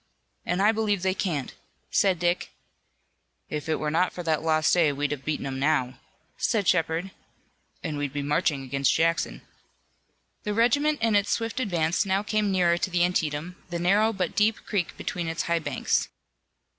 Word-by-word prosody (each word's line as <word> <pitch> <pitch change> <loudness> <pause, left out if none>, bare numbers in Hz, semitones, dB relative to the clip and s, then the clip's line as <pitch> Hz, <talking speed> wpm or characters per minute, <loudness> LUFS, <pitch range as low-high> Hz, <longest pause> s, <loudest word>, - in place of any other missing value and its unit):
"And 180 +3 +1
I 210 - +6
believe 210 -4 0
they 190 0 +2
can't," 160 -9 -2 0.4
said 190 -3 +3
Dick. 175 +1 0 1.0
"If 150 +1 -4
it 160 - +2
were 150 -1 -2
not 180 +3 +2
for 175 - -6
that 160 -2 0
lost 155 -1 +2
day 165 -4 +4
we'd 145 +1 -2
have 145 - -2
'em - - -25
beaten 140 -3 -2
now," 135 -3 +1 0.4
said 215 -6 +1
Shepard, 165 +2 +1 0.7
"and 150 -2 -3
we'd 145 -2 -2
be 145 0 -3
marching 145 -1 0
against 135 +1 +1
Jackson." 165 +1 0 1.0
The 210 -1 -3
regiment 285 +5 +2
in 225 -2 +3
its 205 0 +2
swift 230 +2 -1
advance 175 -8 +1
now 195 0 0
came 210 -1 0
nearer 175 -2 +3
to - - -1
the 175 -1 +2
Antietam, 165 0 -2
the 175 - -3
narrow 200 +6 +3
but 190 -5 -3
deep 220 +2 +2
creek 195 -5 -2
between 175 -2 -3
its 165 0 -2
high 170 0 +1
banks. 145 -5 0
175 Hz, 175 wpm, -26 LUFS, 155-200 Hz, 1.0 s, I